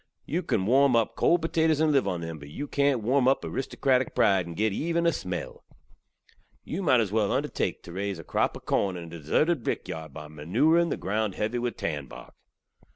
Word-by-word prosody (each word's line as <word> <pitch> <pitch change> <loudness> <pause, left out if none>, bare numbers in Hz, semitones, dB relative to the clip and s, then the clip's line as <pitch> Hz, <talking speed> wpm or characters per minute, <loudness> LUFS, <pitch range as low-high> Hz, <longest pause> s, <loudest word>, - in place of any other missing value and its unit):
Yu 170 +5 -1
kan 105 - -1
warm 135 +3 +4
up 115 -2 +1
kold 170 -1 +3
potatoze 160 -2 +2
and 160 -1 +3
liv 135 -7 +2
on 90 -3 -2
them, 80 -2 -6
but 70 0 -11
yu 145 - -6
kant 140 -4 +1
warm 130 +3 +2
up 135 - +3
aristokratik 130 -1 0
pride 95 -3 +3
and 85 - -7
git 110 +1 +1
even 170 +7 0
a 170 - +5
smell. 90 -1 -5 1.0
Yu 175 - -4
might 145 -9 +4
az 110 -4 0
well 105 -2 +1
undertake - - -1
tew 85 - -10
raze 100 +1 -3
a 80 - -9
krop - - 0
ov - - -17
korn 95 -2 0
in 85 - -7
a - - -9
deserted 115 - 0
brikyard 80 -8 -4
by 75 +2 -9
manuring 115 - +2
the - - -2
ground 105 0 -2
heavy 110 +3 -1
with 120 0 -3
tanbark. 75 -4 -5
110 Hz, 205 wpm, -27 LUFS, 90-140 Hz, 1.0 s, a